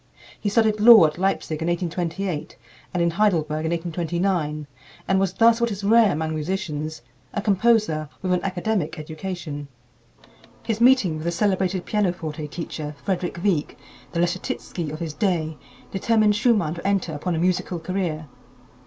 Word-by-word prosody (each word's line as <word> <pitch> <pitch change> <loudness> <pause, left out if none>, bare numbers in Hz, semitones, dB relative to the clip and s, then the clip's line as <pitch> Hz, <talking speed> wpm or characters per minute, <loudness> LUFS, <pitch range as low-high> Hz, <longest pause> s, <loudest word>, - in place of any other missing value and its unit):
He 205 - -1
studied 215 0 +2
law 220 -4 +9
at 155 +2 -2
Leipzig 180 -4 -1
in 165 - -1
1828 175 -1 -2 0.3
and 175 -1 0
in 170 - +2
Heidelberg 160 -5 +1
in - - 0
1829, 170 -2 -1 0.4
and 190 0 +3
was 190 -2 0
thus 230 +3 +4
what 235 - +2
is 200 -2 -5
rare 220 0 +5
among 160 0 -2
musicians 155 -2 -3 0.3
a - - +1
composer 205 -7 +2
with 185 -1 +1
an 180 - +1
academic 185 -2 -1
education. 155 -2 -6 1.0
His 225 -1 -2
meeting 240 -10 +5
with 155 - -7
the 170 - +1
celebrated 190 0 0
pianoforte 175 -7 -1
teacher, 150 -2 -6
Frederick 180 -3 -2
Wieck, 180 -8 0 0.4
the 170 - -1
Leschetitzki 170 -2 -3
of 155 - -5
his 165 -3 -4
day, 165 -5 0 0.4
determined 215 +1 +2
Schumann 210 -8 +2
to 170 +2 -5
enter 195 -5 0
upon 170 +4 -2
a - - -1
musical 180 +1 0
career. 165 -3 -3
175 Hz, 155 wpm, -23 LUFS, 160-200 Hz, 1.0 s, law